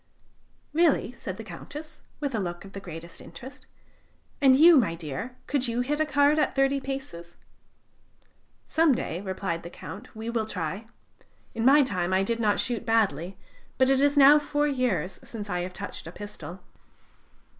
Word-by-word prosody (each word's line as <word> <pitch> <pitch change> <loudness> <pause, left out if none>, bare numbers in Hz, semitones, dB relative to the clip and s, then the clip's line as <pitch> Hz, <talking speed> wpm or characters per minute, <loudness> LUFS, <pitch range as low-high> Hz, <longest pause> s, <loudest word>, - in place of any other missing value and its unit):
"Really?" 320 -6 +3
said 195 -6 -7
the 225 - -7
Countess, 290 - -9 0.2
with 285 -3 -2
a 220 - 0
look 175 -1 -4
of 195 - -13
the 195 - -6
greatest 170 -2 -9
interest. 240 +11 -12 0.7
"And 265 -2 +7
you, 330 +5 +8
my 205 - +3
dear, 170 - -6
could 270 -3 0
you 235 +1 0
hit 295 +4 -1
a 310 - +1
card 290 +1 +3
at 295 - +1
thirty 270 0 +2
paces?" 265 -12 -6 1.3
"Some 320 -4 +3
day," 175 -5 -4
replied 190 -3 -3
the 170 - -8
Count, 210 +7 -10
"we 220 +1 -6
will 230 -2 -1
try. 190 +3 -4 0.7
In 225 0 -2
my 285 +3 +7
time 185 -7 -1
I 190 +1 +3
did 230 +3 -1
not 210 -2 +2
shoot 240 -3 -1
badly, 195 -6 +1 0.4
but 260 0 +4
it 270 0 +3
is 285 +1 +3
now 285 +2 +8
four 295 0 0
years 240 - -1
since 210 -3 -7
I 180 0 -1
touched 185 -1 -8
a - - -7
pistol." 185 -3 -9
225 Hz, 170 wpm, -27 LUFS, 185-275 Hz, 1.3 s, you